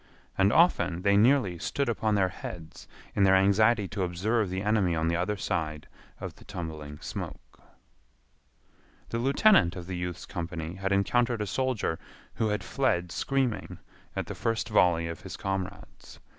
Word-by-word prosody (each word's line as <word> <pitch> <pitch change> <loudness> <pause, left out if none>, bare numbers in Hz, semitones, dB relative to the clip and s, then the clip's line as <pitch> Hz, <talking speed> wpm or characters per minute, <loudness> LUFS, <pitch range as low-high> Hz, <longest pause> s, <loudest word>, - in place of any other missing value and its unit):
And 100 +1 +3
often 95 - +3
they 100 0 +4
nearly 105 -5 +3
stood 140 - -1
upon 110 -2 +1
their 95 -2 +2
heads 85 -3 -9 0.3
in - - +1
their 95 0 +6
anxiety 100 +2 +4
to 100 +3 -4
observe 95 +4 0
the 95 +1 -3
enemy 105 -5 +2
on 80 0 0
the 85 - +1
other 95 +4 -1
side 80 -5 -3 0.3
of - - -6
the - - -17
tumbling 80 -6 -7
smoke. - - -8 1.5
The 115 - -2
lieutenant 135 - +4
of 90 -2 -7
the 90 0 -5
youth's 90 0 -4
company 85 -2 -5
had 95 +1 -3
encountered 115 +3 +2
a - - -3
soldier 125 -6 -1 0.3
who 110 - 0
had 105 -2 -1
fled 85 0 0
screaming 135 +1 -1 0.4
at - - -2
the - - -6
first 115 -1 -1
volley 90 -5 +3
of 85 - -6
his - - -8
comrades. 95 0 -5
95 Hz, 160 wpm, -28 LUFS, 85-110 Hz, 1.5 s, their